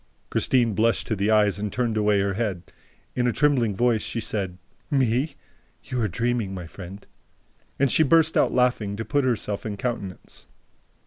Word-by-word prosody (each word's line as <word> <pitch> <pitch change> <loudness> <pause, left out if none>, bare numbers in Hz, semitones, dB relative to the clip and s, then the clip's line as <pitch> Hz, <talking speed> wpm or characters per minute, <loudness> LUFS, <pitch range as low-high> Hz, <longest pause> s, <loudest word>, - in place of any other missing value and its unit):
Christine 120 -4 +2
blushed 115 +3 +2
to 110 - -1
the 100 +2 0
eyes 105 -2 +3
and 105 0 -3
turned 120 -3 -1
away 105 -2 +2
her 100 0 0
head. 100 -4 -2 0.5
In 125 -1 +1
a - - +3
trembling 125 -7 +2
voice, 120 0 +2
she 115 - -3
said: 95 -5 -3 0.3
"Me? 135 +1 +1 0.5
You 125 -2 -3
are 110 - +2
dreaming, 115 0 -1
my 90 -2 -6
friend!" 95 +3 -10 0.7
And 140 -2 +2
she - - +4
burst 160 +1 +4
out - - +3
laughing, 120 -5 +1
to 110 +2 -5
put 140 +5 +1
herself 105 -5 -1
in 105 -2 -4
countenance. 100 -6 -5
110 Hz, 175 wpm, -24 LUFS, 100-125 Hz, 0.7 s, she